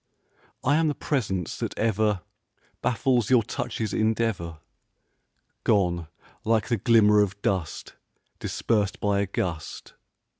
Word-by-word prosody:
I 145 +3 +3
am 165 0 +3
the 150 - 0
presence 100 - -2
that - - -4
ever 110 -3 +1 0.6
Baffles 120 -2 +1
your 125 -3 +5
touch's 110 0 -3
endeavor, 110 -7 0 1.1
Gone 90 -6 +2 0.4
like 110 -1 +1
the 120 - +2
glimmer 105 -1 +5
of 100 0 -1
dust 90 -5 -2 0.5
Dispersed 105 -3 0
by 100 -1 +1
a 100 - 0
gust. 85 -4 -4
105 Hz, 115 wpm, -26 LUFS, 95-115 Hz, 1.1 s, your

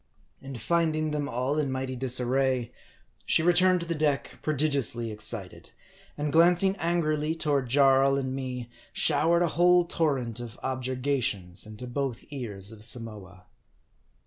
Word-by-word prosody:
And 135 -2 -8
finding 155 +1 0
them 145 -1 -2
all 130 +5 -1
in 140 -3 -1
mighty 130 0 -3
disarray, 130 0 +1 0.6
she 160 - +3
returned 180 +1 +4
to - - -2
the 170 - -1
deck 150 -3 -1
prodigiously 140 -6 0
excited, 105 -2 -4 0.5
and 150 0 -2
glancing 175 +4 +4
angrily 160 -2 0
toward 145 -6 0
Jaii 135 0 +4
and 130 -1 -2
me, 130 -2 -5 0.3
showered 170 +2 +3
a 170 - +1
whole 175 +2 +4
torrent 135 -9 -1
of 120 -1 -8
objurgations 130 -8 -2
into 110 +3 -9
both 125 -1 -3
ears 110 -7 -5
of 110 -1 -11
Samoa. 105 -6 -4
135 Hz, 135 wpm, -27 LUFS, 120-155 Hz, 0.6 s, returned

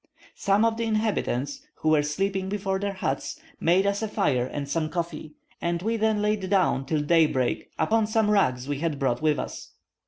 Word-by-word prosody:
Some 200 +3 +2
of 225 -1 +1
the 230 - -1
inhabitants, 215 - -1
who 155 - -1
were 155 -1 +5
sleeping 190 +6 -1
before 195 -1 -1
their 200 0 -2
huts, 140 -8 -3 0.2
made 180 +4 +3
us 200 +1 0
a 220 - -1
fire 130 -10 +1
and 140 +1 -5
some 155 +2 -1
coffee, 160 -2 -4 0.3
and 170 0 0
we 225 +2 0
then 220 -1 +1
laid 210 -3 0
down 180 -9 +2
till 150 0 0
daybreak 150 -6 +2
upon 220 -1 +2
some 215 -1 +2
rugs 130 -11 +2
we 145 -1 -2
had 160 -2 -1
brought 130 -2 0
with 155 -1 +2
us. - - -6
180 Hz, 190 wpm, -26 LUFS, 150-210 Hz, 0.3 s, were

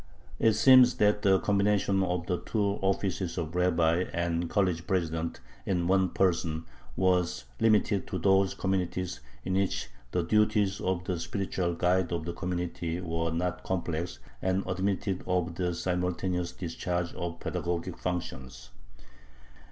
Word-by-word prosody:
It 110 - +4
seems 125 +2 +7
that 105 -3 +3
the 95 -2 +4
combination 100 -1 +2
of 90 -2 -1
the 90 -1 -1
two 100 -2 -1
offices 95 -2 -1
of 80 -2 -3
rabbi 90 -1 +2
and 85 0 -1
college 90 -4 0
president 85 -3 -1 0.2
in 90 -3 0
one 95 0 +3
person 85 -3 0 0.3
was 90 -7 +1
limited 105 -2 +3
to 95 - -3
those 95 +2 +3
communities 90 -2 -1 0.3
in 95 - -1
which 95 0 0 0.2
the 90 +7 0
duties 105 +1 +2
of 90 -1 -1
the 90 -2 -2
spiritual 95 -3 -2
guide 90 +1 +1
of 85 -2 -2
the 85 - -3
community 90 -1 -3
were 85 -2 -2
not 90 +2 -2
complex, 85 -2 -2 0.2
and 95 +1 0
admitted 95 +1 -1
of 90 -1 0
the 90 0 -1
simultaneous 90 0 -1
discharge 85 0 -3
of 85 -1 -5
pedagogic 85 0 -3
functions. 65 -9 -5
90 Hz, 135 wpm, -29 LUFS, 85-95 Hz, 0.3 s, seems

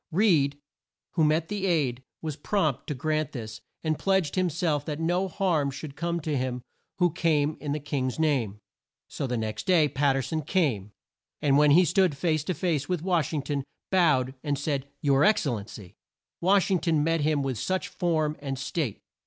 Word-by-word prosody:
Reed, 155 -7 +3 0.5
who 165 - +1
met 155 +2 +2
the 200 -2 -2
aide 140 -8 +1 0.2
was 155 -3 -3
prompt 155 - -1
to 150 - -2
grant 155 +2 -1
this 110 -4 -7 0.2
and 155 -2 0
pledged 190 -6 +1
him 185 -1 +1
self 155 -3 0
that 150 -1 -4
no 175 +4 +1
harm 170 -6 0
should 140 +1 -7
come 170 +3 -2
to 150 -1 -2
him 125 -2 -2 0.3
who 180 -2 +3
came 155 -3 +1
in 145 - -4
the 150 - -1
King's 135 -3 -2
name. 135 -10 +1 0.5
So 140 - -4
the 125 -1 -1
next 110 - -4
day 170 -5 +5
Pat 140 -1 +1
ter 135 - 0
son 160 +3 -2
came, 130 - 0 0.5
and 140 -2 +2
when 150 +1 +5
he 175 +5 +6
stood 180 -4 +2
face 155 -2 +1
to 185 - -1
face 155 -6 -1
with 180 -3 -1
Wash 175 -5 +1
ing 150 -4 -2
ton, 140 -1 -2 0.3
bowed 145 -9 +3
and 145 -2 -1
said 140 -1 -2
"Your 140 -1 +3
Ex 215 +1 +4
cel 140 -6 0
len 105 -3 -5
cy." 95 -5 -11 0.5
Wash 195 +2 +3
ing 185 - +3
ton 160 -4 +1
met 165 0 +1
him 150 -1 +1
with 130 - -3
much 185 0 0
form 155 -4 0
and 135 -2 -4
state. 135 - -3
150 Hz, 200 wpm, -27 LUFS, 135-170 Hz, 0.5 s, he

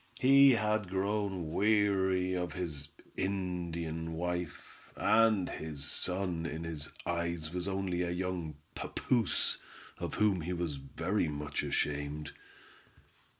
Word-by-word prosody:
He 135 +1 +8
had 110 -3 +1
grown 95 -3 -1
weary 95 -3 +3
of 90 -1 -2
his 75 -6 -4 0.3
Indian 85 -4 -2
wife, 90 -1 -4 0.2
and 110 -3 +4
his 75 -3 -4
son 90 -2 0
in 80 +1 -4
his 80 -2 -4
eyes 85 -2 -1
was 90 +1 -2
only 95 -2 -1
a 90 - 0
young 90 -3 -2 0.2
papoose, 120 -3 0 0.4
of - - -3
whom 105 -4 +3
he 90 +3 -2
was 85 -5 -2
very 85 +8 -1
much 75 0 -2
ashamed. 75 +1 -2
90 Hz, 115 wpm, -32 LUFS, 80-95 Hz, 0.4 s, He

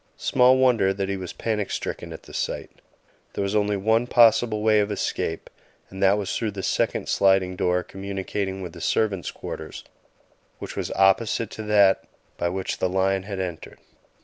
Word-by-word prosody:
Small 125 +1 +4
wonder 120 -7 +3
that 100 0 -2
he 100 - -1
was 95 -2 -6
panic 105 -3 -2
stricken - - -4
at - - -9
the - - -14
sight. - - -3 0.6
There - - -2
was 100 +1 -2
only 105 -1 +1
one 110 +4 +2
possible 115 -2 +4
way 110 -1 +4
of 105 0 0
escape, 80 -4 -3 0.4
and 95 +1 -8
that 100 +1 +4
was 100 -2 -3
through 115 - -1
the 95 -1 -6
second - - 0
sliding 95 -2 +3
door 90 0 +1
communicating 95 0 -4
with 85 -3 -7
the - - -10
servants' 100 -5 0
quarters, - - -8 0.7
which - - -8
was - - -3
opposite 100 +3 +2
to 110 - -7
that 100 -2 +4 0.3
by 85 - -1
which 95 +1 -3
the 90 - +1
lion 95 +1 +1
had 100 0 -6
entered. 90 -3 -6
100 Hz, 175 wpm, -24 LUFS, 95-110 Hz, 0.7 s, Small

